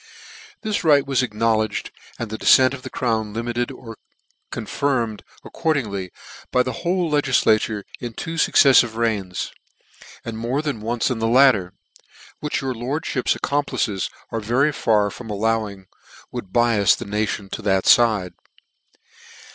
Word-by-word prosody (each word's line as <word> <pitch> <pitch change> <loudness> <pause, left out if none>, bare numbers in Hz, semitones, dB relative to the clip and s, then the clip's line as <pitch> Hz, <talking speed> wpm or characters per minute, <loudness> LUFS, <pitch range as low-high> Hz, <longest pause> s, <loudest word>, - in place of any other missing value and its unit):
This 215 -2 -1
right 145 -4 +4
wns 135 -2 +1
acknowledged, 110 -2 -1 0.3
and 115 -3 -5
the 110 - -4
dcfcent 130 0 +5
of 135 - -7
the - - -8
crown 110 -4 -1
limited 120 +2 -2
or 115 -3 -10 0.5
confirmed 120 -7 -2 0.2
accord 160 -2 0
ingly, 100 -7 -4 0.4
by 125 - +3
the 130 - -3
whole 175 -2 0
Icgiilatures 110 -7 +2 0.2
in 120 -2 -6
two 165 +8 -5
fucceffive 135 -7 +5
reigns, 105 -6 -2 0.7
and 115 -1 -5
more 125 +6 -1
than 140 -8 -3
once 115 +3 -1
in 120 - -2
the 115 - 0
latter; 115 -7 +4 0.7
which 150 -1 -2
your 135 -1 -2
lordfhips 130 +2 -1
accomplices 135 -8 -1 0.2
are 115 - -2
very 125 +8 +1
far 105 -6 +1
from 120 -3 -10
al 105 -1 -4
lowing 110 -3 -1 0.5
would 95 - -7
bias 115 -4 +3
the 120 - -7
nation 105 -1 -2
to - - -5
that 95 -2 +1
fide. 110 -6 +4
115 Hz, 145 wpm, -22 LUFS, 105-135 Hz, 0.7 s, dcfcent